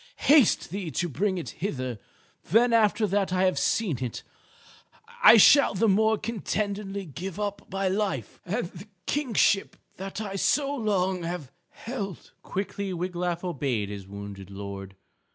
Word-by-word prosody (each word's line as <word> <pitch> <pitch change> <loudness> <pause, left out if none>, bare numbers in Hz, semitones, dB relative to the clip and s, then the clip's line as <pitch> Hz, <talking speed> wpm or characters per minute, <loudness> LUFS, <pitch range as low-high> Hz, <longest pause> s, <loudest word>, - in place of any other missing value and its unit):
Haste 280 - +5
thee 190 -3 -4
to 175 +3 -1
bring 185 - -1
it 170 - -5
hither; 130 - -3 0.5
then 230 +6 +4
after 220 -1 +3
that 200 -1 0
I 185 0 +2
have 185 -1 +2
seen 170 - 0
it, 120 - -5 1.0
I 230 - +9
shall 280 +1 +7
the 225 +4 +2
more 220 +2 +3
contentedly 205 -3 -3
give 175 +5 -7
up 205 -2 -4
my 195 0 0
life 190 - -2
and 210 +5 -2
the 190 +4 -11 0.2
kingship 235 -8 +1 0.2
that 195 +2 -6
I 200 -2 -4
so 280 +7 +2
long 190 -7 0
have 165 -5 -5 0.2
held." 200 - -6
Quickly 200 0 -4
Wiglaf 175 0 -2
obeyed 135 - -1
his 100 -2 -7
wounded 100 -1 -8
lord. 100 -1 -7
190 Hz, 145 wpm, -27 LUFS, 160-210 Hz, 1.0 s, I